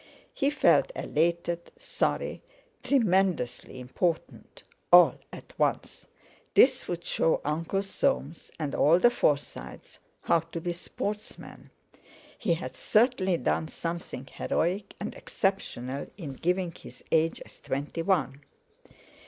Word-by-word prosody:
He 275 - +1
felt 295 +10 +3
elated, 170 +2 -1
sorry, - - -2 0.4
tremendously 190 - +1
important 160 +7 -3 0.3
all - - +8
at - - -11
once. - - -1 0.5
This 260 0 +5
would 175 -1 -4
show 165 - +2
Uncle 165 +6 -1
Soames, 195 - -1
and 150 -3 -3
all 160 +4 +5
the 240 +6 +5
Forsytes, 145 -11 -2 0.2
how 170 - +3
to 165 +1 -7
be 175 +1 -3
sportsmen. 205 +4 -6 0.7
He 170 - 0
had 170 - -7
certainly 210 -6 +2
done 160 - 0
something 165 -6 -5
heroic 185 +8 -2
and 210 - -4
exceptional 140 - -3
in 155 -8 -6
giving 180 +4 -1
his - - -14
age 165 0 +2
as - - -16
twenty 145 +5 -3
one. 160 -7 0
170 Hz, 115 wpm, -28 LUFS, 155-195 Hz, 0.7 s, all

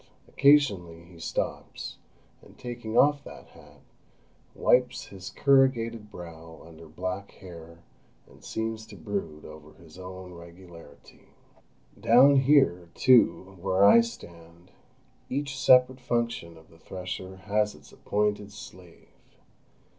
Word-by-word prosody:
Occasionally 100 - +2
he 85 -1 -17
stops, - - -5 0.4
and - - -19
taking 120 -3 -6
off 145 0 +4
that - - -13
hat, - - -19 0.7
wipes 125 0 +2
his 95 -2 -10
corrugated 120 -6 +1
brow 80 -4 -11
under 80 0 -14
black 90 +5 -6
hair, 85 -2 -13 0.4
and - - -21
seems 110 0 -5
to 105 - -12
brood 80 -4 -6
over 75 0 -13
his 80 +4 -17
own 95 0 -10
regularity. 85 0 -15 0.7
Down 135 +4 +6
here, 135 - +3
too, 110 -6 +3
where 95 +1 +3
I 235 - +7
stand, 85 - -11 0.6
each 140 0 -3
separate 130 -1 +4
function 115 -9 -3
of 80 - -19
the 80 - -20
thresher 95 +1 -7
has 105 +2 -1
its - - -18
appointed 105 0 -2
slave. 90 -4 -14
95 Hz, 115 wpm, -27 LUFS, 85-120 Hz, 0.7 s, I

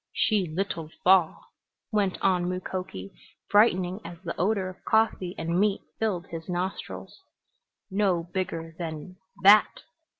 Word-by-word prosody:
"She 205 -5 +1
little 165 -1 -3
fall," 185 -3 +3 0.4
went 205 -4 0
on 180 -2 +2
Mukoki, 180 - -5 0.4
brightening 190 -3 +3
as 170 0 -8
the 170 - -4
odor 195 +1 0
of 185 - -10
coffee 220 -5 +1
and 170 +2 -1
meat 205 0 +2 0.2
filled 195 -6 -1
his 165 +1 -7
nostrils. 180 +2 -5 0.7
"No 190 -4 +1
bigger 165 -2 -4
than 165 +2 -6 0.3
that!" 205 +2 +6
185 Hz, 125 wpm, -27 LUFS, 170-195 Hz, 0.7 s, that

